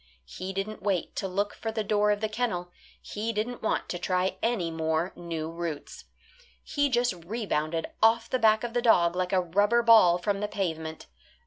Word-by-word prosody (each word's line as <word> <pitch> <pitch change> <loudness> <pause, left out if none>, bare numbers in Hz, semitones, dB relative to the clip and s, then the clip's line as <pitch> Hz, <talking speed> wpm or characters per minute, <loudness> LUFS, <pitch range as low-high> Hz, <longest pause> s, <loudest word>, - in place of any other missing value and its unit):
He 185 - -6
didn't 195 +3 -4
wait 195 -4 -1
to 195 - -1
look 200 +2 -1
for 225 - -4
the 220 -1 -2
door 210 0 +2
of 205 0 +1
the 220 - +1
kennel; 215 -6 -2 0.3
he 215 +2 -4
didn't 230 +3 -3
want 220 - -1
to 175 - -3
try 185 +1 0
any 215 -8 0
more 160 +2 -1
new 165 -2 -5
routes. 165 -3 -6 0.6
He 285 -1 0
just 245 -3 +2
rebounded 170 -6 -2 0.2
off 225 +1 +4
the 255 - -1
back 220 -1 +4
of 240 -1 -4
the 240 - +1
dog 175 -7 +4
like 180 0 -1
a 190 - +3
rubber 205 +7 +2
ball 220 -7 +7
from 195 +2 -1
the 210 - -1
pavement. 160 -5 -4
200 Hz, 190 wpm, -28 LUFS, 175-225 Hz, 0.6 s, ball